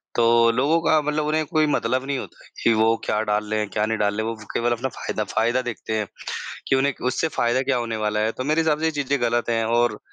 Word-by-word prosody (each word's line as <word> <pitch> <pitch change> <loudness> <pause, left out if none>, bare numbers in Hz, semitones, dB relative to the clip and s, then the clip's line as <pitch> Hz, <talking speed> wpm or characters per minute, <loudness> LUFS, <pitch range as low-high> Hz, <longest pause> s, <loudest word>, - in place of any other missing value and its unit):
तो 115 0 +5
लोगों 140 +8 +2
का 155 -2 +3
मतलब 150 +1 -1
उन्हें 155 +1 +1
कोई 155 +1 +1
मतलब 130 -3 0
नहीं 140 -1 -1
होता - - -9 0.2
कि 115 - +4
वो 110 +1 +3
क्या 105 - 0
डाल 105 0 0
रहे 110 - +1
हैं, 105 -1 -2
क्या 105 +2 0
नहीं 110 0 -1
डाल 105 -1 +1
रहे 110 0 -1
हैं। 115 - -3
वो 110 -1 -13
केवल 120 +1 +1
अपना 120 +3 -1
फ़ायदा 110 - -4
फ़ायदा 115 +5 0
देखते 120 -3 -5
हैं 105 -1 -2 0.6
कि 135 - +4
उन्हें 135 +1 +1
उससे 145 +5 0
फ़ायदा 120 +2 +2
क्या 135 -1 +1
होने 115 -2 -3
वाला 105 0 0
है। 110 +1 +1
तो 130 - -5
मेरे 155 +3 +2
हिसाब 160 -2 +2
से - - -2
ये - - +2
चीज़ें 145 -2 -1
ग़लत 120 0 +1
हैं 115 -1 +1
और 120 +1 +1
120 Hz, 260 wpm, -23 LUFS, 110-140 Hz, 0.6 s, तो